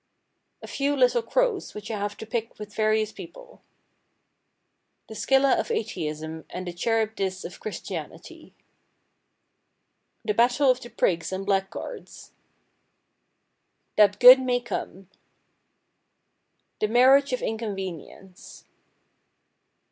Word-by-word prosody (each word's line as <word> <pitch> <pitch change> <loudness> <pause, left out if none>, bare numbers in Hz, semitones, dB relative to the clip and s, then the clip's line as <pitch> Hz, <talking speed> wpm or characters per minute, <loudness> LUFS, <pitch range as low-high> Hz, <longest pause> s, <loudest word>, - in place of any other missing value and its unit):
A - - -8
Few 285 +1 -1
Little 250 -3 +3
Crows 465 - -1
which 210 +1 -7
I 215 - -3
have 205 0 -4
to - - -8
pick 225 +1 -4
with 210 -1 -9
various 215 0 +1
people. - - -13 1.5
The - - -9
Scylla 270 +6 +2
of - - -3
Atheism 160 -6 -4
and 185 +1 -6
the 175 - -5
Charybdis 210 -1 -1
of 175 - -9
Christianity. 215 - -8 1.7
The 210 - 0
Battle 245 +5 +3
of 255 0 -3
the 240 - -10
Prigs 170 -6 0
and 190 +1 -4
Blackguards. 195 - -4 1.6
That 205 -1 +4
Good 255 +1 +10
may 250 -1 0
Come. 195 -5 -6 1.7
The 215 - +1
Marriage 260 +5 +5
of 255 - -2
Inconvenience. 195 -4 -7
220 Hz, 110 wpm, -25 LUFS, 195-250 Hz, 1.7 s, Good